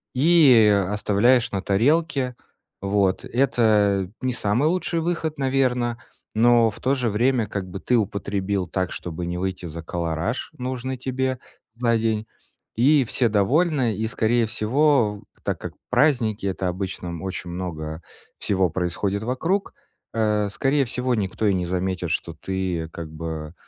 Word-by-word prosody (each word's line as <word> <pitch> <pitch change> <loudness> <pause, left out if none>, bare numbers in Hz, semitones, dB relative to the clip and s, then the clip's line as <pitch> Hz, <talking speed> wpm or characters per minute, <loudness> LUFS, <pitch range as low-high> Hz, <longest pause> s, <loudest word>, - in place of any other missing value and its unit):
И, 135 -6 +6
э, 100 -2 +2
оставляешь 115 +4 +2
на 100 - -2
тарелке. 130 - +1 0.5
Вот. 100 -1 +1
Это 105 -7 +2
не 130 0 0
самый 115 +6 +1
лучший 175 -1 -1
выход, 165 -2 -2
наверно. 130 -3 +1 0.4
Но 115 +1 +5
в 105 - -10
то 130 - +1
же 125 -3 0
время 120 +2 +2
как 100 -3 -5
бы 95 +2 -6
ты 125 - +1
употребил 100 -2 -1
так, 95 0 -2
чтобы 85 0 -5
не 85 0 -3
выйти 95 0 -3
за 85 0 -7
калораж, 85 +7 -3
нужный 130 +1 -3
тебе 130 0 -2 0.4
за 115 -1 +2
день. 110 -1 0 0.5
И 140 +5 +4
все 120 +1 +1
довольны. 125 - +2
И, 110 +1 -1
скорее 115 +2 +1
всего, 115 -1 +2
в - - -28
так - - -2
как - - -6 0.2
праздники- 120 -9 +2
это 95 -1 -1
обычно, 95 0 -4
м, 85 -1 -5
очень 95 -2 -5
много 80 -3 -5 0.4
всего 95 -3 +1
происходит 95 +4 -2
вокруг, 165 - -1 0.4
э, 105 -2 +1
скорее 135 +6 +1
всего, 125 +1 -1
никто 105 0 -1
и 100 - +3
не 90 -1 -1
заметит, 90 -1 -2
что 85 +1 -2
ты 90 0 -3
как 85 -2 -6
бы, 80 0 -6
110 Hz, 150 wpm, -23 LUFS, 95-125 Hz, 0.5 s, И